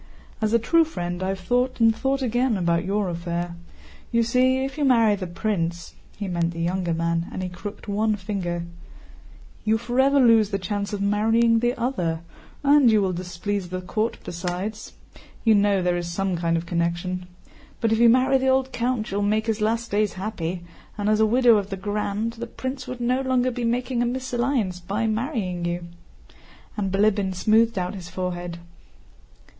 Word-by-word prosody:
"As 215 -1 +1
a 235 - +5
true 330 +9 +3
friend, 175 - -4
I 185 - -1
have 190 0 -2
thought 245 +7 0
and 225 -1 +5
thought 270 +4 0
again 245 -1 +1
about 170 -2 +1
your 200 +1 0
affair. 170 0 -3 0.6
You 235 -1 +3
see, 255 +3 +2
if 270 - -6
you 300 - -1
marry 230 -5 +5
the 190 -2 -3
prince"—he 175 +1 -4
meant 170 -2 -1
the 165 - -7
younger 175 0 0
man—and 170 +2 -2
he 180 - -3
crooked 200 +3 -8
one 215 +1 +1
finger, 185 -4 -3 1.0
"you 220 +1 +2
forever 265 +4 +2
lose 225 -5 +5
the 195 - -1
chance 200 +2 -3
of 200 -1 -2
marrying 225 +3 +3
the 240 +2 +1
other, 180 -10 -1 0.4
and 285 -3 +6
you 215 -1 +4
will 190 -2 0
displease 180 +2 -3
the 185 0 -3
court 215 +5 -2
besides. 180 +5 -5 0.5
(You 225 - +5
know 200 -2 +3
there 175 0 +1
is 175 0 -4
some 195 +1 -1
kind 165 0 0
of 165 - -4
connection.) 175 +2 -2 0.5
But 225 -2 +1
if 225 - +2
you 235 0 +7
marry 255 +2 +4
the 265 - 0
old 265 0 +2
count 240 -3 -1
you 200 - -1
will 205 - 0
make 215 +2 +1
his 220 -1 -1
last 230 +2 0
days 210 0 +1
happy, 185 -3 -4 0.3
and 205 0 0
as 215 0 +3
widow 235 +1 +5
of 200 -1 -2
the 195 - -4
Grand... 210 +2 -2
the 235 0 -6
prince 260 +2 -5
would 250 -1 -6
no 250 +2 +1
longer 255 -1 +1
be 240 -1 -3
making 245 +1 0
a 240 - +2
mésalliance 245 -6 -1
by 205 +5 -1
marrying 215 - -2
you," 175 0 -2 0.9
and 195 -3 -2
Bilíbin 200 -1 +2
smoothed 220 +3 +3
out 180 +1 -1
his 180 -3 -8
forehead. 175 -1 -4
210 Hz, 180 wpm, -24 LUFS, 180-235 Hz, 1.0 s, you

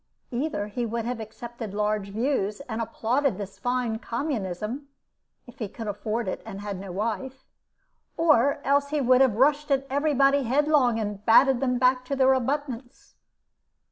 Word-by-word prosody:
Either 245 -4 -2
he 210 +4 -4
would 230 0 -2
have 245 -1 -3
accepted 225 -1 -7
large 210 -1 -1
views, 215 -2 -1
and 230 -4 -4
applauded 245 +4 0
this 200 -1 -7
fine 245 -3 -1
communism 235 - -3 0.6
(if 245 +1 -15
he 220 - -2
could 225 +2 -8
afford 215 +2 -3
it, 185 - -3
and 200 -3 -8
had 205 -2 -5
no 195 -1 -7
wife), 230 +7 -4 0.7
or 285 -4 +3
else 280 +1 +2
he 300 0 0
would 255 -1 +4
have 260 -6 +4
rushed 290 +5 +3
at 275 -1 +1
every 285 +2 +1
body 275 +1 +4
headlong, 265 -2 +2
and 205 -2 -4
batted 260 +3 +6
them 250 -2 +1
back 255 0 +3
to 275 +2 -3
their 265 0 +5
abutments. 260 -1 -3
245 Hz, 165 wpm, -26 LUFS, 215-275 Hz, 0.7 s, batted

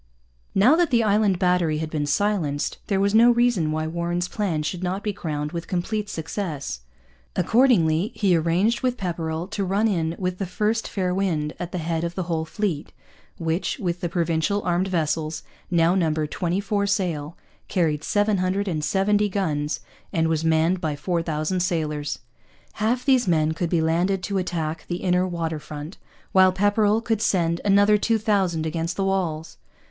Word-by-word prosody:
Now 235 +10 +6
that 345 -2 +3
the 235 -2 +3
Island 205 -2 +3
Battery 180 -4 +2
had 155 0 -4
been 150 -2 -1
silenced 160 -4 0
there 195 -3 +1
was 200 +1 +2
no 230 +2 +7
reason 240 -10 +2
why 155 0 -1
Warren's 170 +2 -2
plan 180 -8 -1
should 175 +3 -3
not 185 +2 -2
be 210 - -1
crowned 150 -6 -4
with 170 -1 -5
complete 205 +3 -2
success. 160 - -4 0.6
Accordingly 185 -3 +3
he 195 -4 +3
arranged 170 +8 +1
with 250 -1 0
Pepperrell 165 -3 -3
to 205 -1 -1
run 200 +4 +1
in 165 -5 0
with 180 -1 -3
the 195 - -2
first 215 +5 -1
fair 185 -2 -1
wind, 165 -6 -1
at 175 0 -5
the 180 - -3
head 165 0 -2
of 170 0 -3
the 185 - -2
whole 165 -2 -2
fleet, 170 -4 -3 0.5
which, 165 - -1
with 180 -7 -3
the 175 - -1
Provincial 170 +4 0
armed 180 +1 +1
vessels, 160 -3 -1 0.3
now 170 0 +3
numbered 155 -4 0
twenty 180 +1 -1
four 200 0 0
sail, 175 -6 -1 0.3
carried 155 -5 0
770 200 0 +1
guns, 155 -6 -1 0.3
and 165 -4 +1
was 160 -1 0
manned 160 +3 +2
by 155 -2 -1
4,000 165 +1 -1
sailors. 150 -5 -1 0.6
Half 245 +4 +1
these 260 -5 +3
men 160 -3 +2
could 165 +1 -2
be 170 -2 +2
landed 175 +4 +1
to 195 +1 -1
attack 165 -3 -3
the 175 0 -4
inner 180 0 +2
water 165 -3 -3
front, 150 +3 -8 0.3
while 185 -1 +6
Pepperrell 205 +3 +2
could 225 -2 -1
send 170 -4 +1
another 205 +1 +4
2,000 200 -8 +1
against 165 +1 -2
the 195 - 0
walls. 170 -5 -2
180 Hz, 165 wpm, -24 LUFS, 160-200 Hz, 0.6 s, no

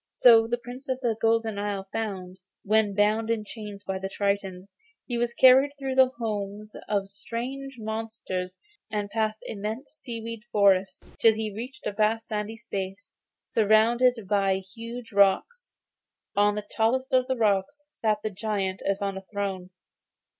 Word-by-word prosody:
So 225 -2 +7
the 240 +1 0
Prince 245 +3 -10
of 260 0 0
the 235 -3 +1
Golden 225 -2 +2
Isle 200 -1 -3
found, 190 -4 -4 0.2
when 210 -1 +2
bound 215 +2 +2
in 230 -2 0
chains 210 -2 -8
by 190 -1 -3
the 195 0 -4
tritons, 195 -2 -2 0.4
he 245 - -3
was 235 0 -1
carried 265 +2 +7
through 270 -1 -3
the 260 -1 +6
homes 210 -2 -4
of 200 -2 0
strange 255 +7 -5
monsters 220 -4 -4 0.3
and 205 -2 -3
past 215 -1 -1
immense 220 +7 -5
seaweed 230 -6 -7
forests, 195 -2 +3 0.2
till 225 -1 +6
he 215 -1 -3
reached 255 +7 -8
a - - 0
vast 215 +2 +1
sandy 215 0 -4
space, 195 0 -6 0.3
surrounded 225 +2 +3
by 195 -1 +2
huge 230 +5 -8
rocks. 200 - +2 0.6
On 205 0 +4
the 210 -1 -4
tallest 260 +4 0
of 255 0 +4
the 260 - 0
rocks 220 +7 +1
sat 215 -5 -1
the 215 - -2
giant 195 -2 -2
as 195 +1 -1
on 195 -1 -2
a 190 - -19
throne. 195 -3 -3
215 Hz, 155 wpm, -27 LUFS, 200-235 Hz, 0.6 s, So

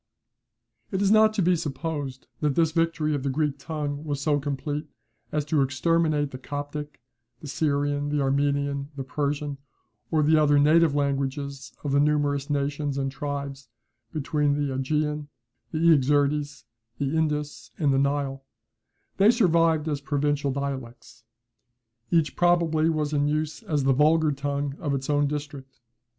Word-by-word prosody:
It 190 - -2
is 200 0 +2
not 215 0 +6
to 200 - +1
be 180 +1 +4
supposed 145 -3 -4
that 150 -3 0
this 165 -2 +3
victory 165 -2 0
of 145 - -1
the 140 - -1
Greek 145 0 -1
tongue 145 -1 -4
was 145 -3 -3
so 145 +1 +1
complete 145 +2 -3 0.4
as 150 -1 -1
to 150 -1 +2
exterminate 150 +2 +1
the 130 - -8
Coptic, 145 +2 -6 0.4
the 150 - -9
Syrian, 145 0 0
the 150 0 0
Armenian, 140 0 0
the 135 - -4
Persian, 145 +1 -2 0.5
or 155 -2 +2
the 155 +2 +4
other 145 -1 +4
native 155 +1 +4
languages 140 -1 -2
of 145 - -2
the 140 - +3
numerous 145 -1 +1
nations 145 0 -1
and 135 -1 -1
tribes 140 -2 -5 0.4
between 150 -1 0
the 145 -2 -1
AEgean, 150 +2 -1 0.4
the 155 - -3
Iaxertes, 145 -2 +2 0.3
the 140 +2 -1
Indus, 150 -2 -2
and 145 -4 +2
the 135 - +3
Nile; 140 -1 -1 0.7
they 200 +2 +6
survived 165 -8 +3
as 145 -2 -2
provincial 145 0 0
dialects. 130 -4 -6 0.8
Each 160 -5 +2
probably 170 -2 +3
was 155 -2 -1
in 145 0 +2
use 155 +4 -2
as 155 -10 -1
the 135 0 +4
vulgar 155 +3 +4
tongue 140 0 -2
of 145 -3 -1
its 135 +2 -2
own 145 0 +2
district. 145 -3 -6
145 Hz, 150 wpm, -26 LUFS, 140-155 Hz, 0.8 s, not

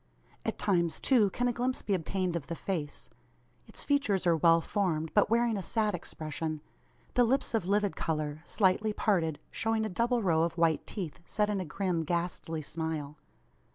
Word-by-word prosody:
At - - -2
times 170 -5 +1
too 230 -7 +4
can 245 +6 0
a 245 - +1
glimpse 250 +2 -1
be 205 - 0
obtained 185 0 -1
of 150 -4 -4
the 170 - -3
face. 160 -5 -4 0.6
Its - - -7
features 270 -11 +1
are 170 -1 +5
well 165 +1 +5
formed, 165 -4 -1
but 210 - +4
wearing 230 -1 +2
a - - -2
sad 215 +1 0
expression; 155 -2 -4 0.5
the 245 - +5
lips 260 +3 +1
of 220 -6 0
livid 205 0 +1
colour, 155 -1 -2
slightly 210 +3 +2
parted, 165 -9 +1
showing 225 -1 0
a - - -2
double 235 +4 +1
row 165 -4 +3
of 165 +1 0
white 165 -1 +2
teeth, 180 -8 -5
set 210 +4 0
in 200 - 0
a 185 - -3
grim 175 +1 -1
ghastly 165 -1 -2
smile. 155 -2 -4
185 Hz, 180 wpm, -30 LUFS, 160-215 Hz, 0.6 s, are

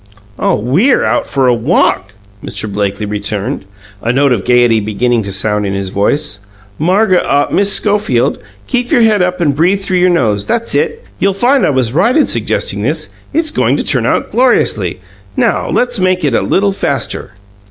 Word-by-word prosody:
"Oh, - - +1
WE'RE 155 - +2
out - - 0
for 135 -2 +1
a 125 - +4
WALK!" 115 - 0 0.3
Mr. 110 - -4
Blakely 100 +1 -2
returned, 105 +3 -3 0.4
a 120 - 0
note 135 +1 +2
of 105 - -3
gayety 120 -2 +3
beginning 115 +3 0
to 100 -2 -6
sound 105 +2 0
in 100 -1 -2
his 100 -1 -3
voice. 105 +3 -1 0.4
"Marg 190 +5 +2
ah 145 -5 +2
Miss 200 0 +2
Schofield, 205 - +1 0.3
keep 245 - -2
your 245 -7 +3
head 215 -3 +3
up 180 0 0
and 145 -5 +1
breathe 180 +6 +1
through 185 -2 0
your 180 +1 +3
nose. 105 - +1
That's 230 0 -1
it! 460 +1 -1
You'll 195 -1 +1
find 255 +6 +2
I - - +1
was 130 -4 0
right 230 - +2
in 305 - +4
suggesting - - -2
this. - - -2 0.2
It's 315 0 0
going - - +1
to - - -2
turn - - 0
out - - -1
gloriously! 110 - +1 0.4
Now, - - 0
let's 245 -3 0
make 185 -1 +1
it 140 - 0
a - - +2
little 200 +1 +1
faster." 195 - -3
145 Hz, 185 wpm, -13 LUFS, -, 0.4 s, a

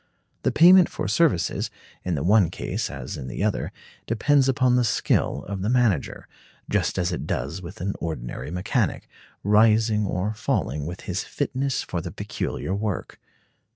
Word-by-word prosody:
The - - +1
payment 180 +2 +7
for - - -4
services, 155 - +1 0.3
in 90 -2 -1
the 70 - -2
one 100 -1 +4
case - - -3
as - - -6
in 65 - -6
the 65 - -3
other, - - -1 0.4
depends 135 +4 +3
upon 130 -2 +3
the 125 - +3
skill 110 -2 0
of 100 -1 -4
the 100 - -1
manager, 120 - +1 0.4
just - - +1
as 90 -1 0
it 85 - -4
does 70 +9 -3
with 90 +4 -9
an 100 +2 -1
ordinary 75 -6 -5
mechanic, 95 - -1 0.4
rising 105 0 +4
or 95 +3 -1
falling 75 -8 -1
with 90 +2 -6
his 90 +2 -3
fitness 135 -1 -2
for 85 - -4
the 85 - -5
peculiar 95 - -4
work. 100 -1 -3
105 Hz, 160 wpm, -24 LUFS, 90-120 Hz, 0.4 s, payment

